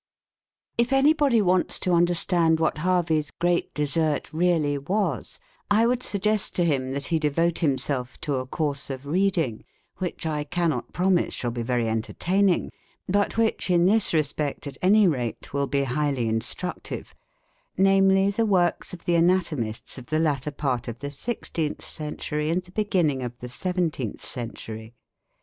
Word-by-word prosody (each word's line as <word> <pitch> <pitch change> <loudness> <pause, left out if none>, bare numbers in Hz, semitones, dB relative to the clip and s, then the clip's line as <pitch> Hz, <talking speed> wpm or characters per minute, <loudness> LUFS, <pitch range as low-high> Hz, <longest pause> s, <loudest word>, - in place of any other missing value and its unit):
If 235 +2 +2
anybody 270 -4 +4
wants 180 -1 +2
to 180 - +1
understand 170 -1 +3
what 160 - 0
Harvey's 165 -3 +1
great 175 0 0
desert 150 0 0
really 160 -3 +2
was, 195 +8 -2 0.3
I 215 +3 +4
would 250 +1 +1
suggest 210 -1 0
to 175 - +2
him 135 -5 0
that 140 +1 -3
he 160 - +3
devote 160 +3 +1
himself 135 -4 +1
to 145 -3 -1
a 130 0 -4
course 145 -1 -2
of 135 0 -6
reading, 165 - 0 0.3
which 180 -3 -4
I 150 -2 -1
cannot 155 -4 -1
promise 180 -1 +1
shall 120 - -2
be 120 0 -4
very 120 -1 0
entertaining, 175 - +1 0.4
but 205 +3 +1
which, 225 -3 +1
in 175 -1 +4
this 215 +3 +3
respect 150 -2 -1
at 140 -2 -8
any 205 +2 +5
rate, 125 -8 -3
will 140 0 0
be 140 0 +1
highly 135 -2 0
instructive 115 +11 -3 0.6
namely, 195 0 +4
the 225 +3 0
works 180 -4 +1
of 170 - -17
the 175 - +1
anatomists 165 -11 0
of 125 - -13
the 155 - 0
latter 150 -3 0
part 135 -5 -2
of 120 -1 -5
the 140 +3 -5
16th 160 - -3
century 150 0 -4
and 175 +2 0
the 180 - -18
beginning 180 -9 +1
of 120 -1 -5
the 125 - -9
17th 160 - -2
century. 115 -1 -5
160 Hz, 155 wpm, -25 LUFS, 140-185 Hz, 0.6 s, any